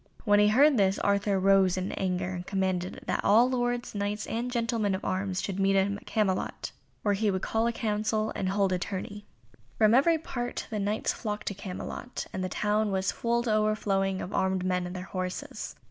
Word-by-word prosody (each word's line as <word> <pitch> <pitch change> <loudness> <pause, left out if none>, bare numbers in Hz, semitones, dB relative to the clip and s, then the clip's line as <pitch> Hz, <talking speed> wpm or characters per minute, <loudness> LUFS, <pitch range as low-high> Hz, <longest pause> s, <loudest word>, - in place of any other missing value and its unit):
When 205 -1 +5
he 210 - +5
heard 270 +6 +5
this, 195 -1 +3
Arthur 200 -1 +1
rose 190 -1 +4
in 185 +1 -2
anger, 185 -1 -1
and 180 -1 -6
commanded 190 -2 -2
that - - -1
all 230 +4 +6
lords, 245 -1 -1
Knights, 205 +1 -2
and 235 +2 -3
gentlemen 230 -4 0
of 190 - -6
arms 185 0 -1
should 195 -1 -3
meet 195 0 +3
him 195 +1 +2
at - - -17
Camelot, 200 -4 -1 0.3
where 205 - +2
he 210 +1 +1
would 190 -1 -1
call 225 +1 +1
a - - +1
council, 215 -1 -1
and 185 - -1
hold 195 -1 +1
a 180 - 0
tourney. 205 +2 -5 0.5
From 215 0 +5
every 320 +6 +5
part 245 -6 -4
the 215 - -2
Knights 205 +2 0
flocked 210 -2 -4
to - - -4
Camelot, 200 +5 -6
and 185 - -3
the 185 - -2
town 210 +2 +1
was 190 0 0
full 235 0 0
to 225 -3 0
overflowing 200 -3 +1
of 185 - -7
armed 190 -1 0
men 180 -1 0
and 180 - -7
their 180 - -5
horses. 185 -1 -5
200 Hz, 205 wpm, -28 LUFS, 190-220 Hz, 0.5 s, all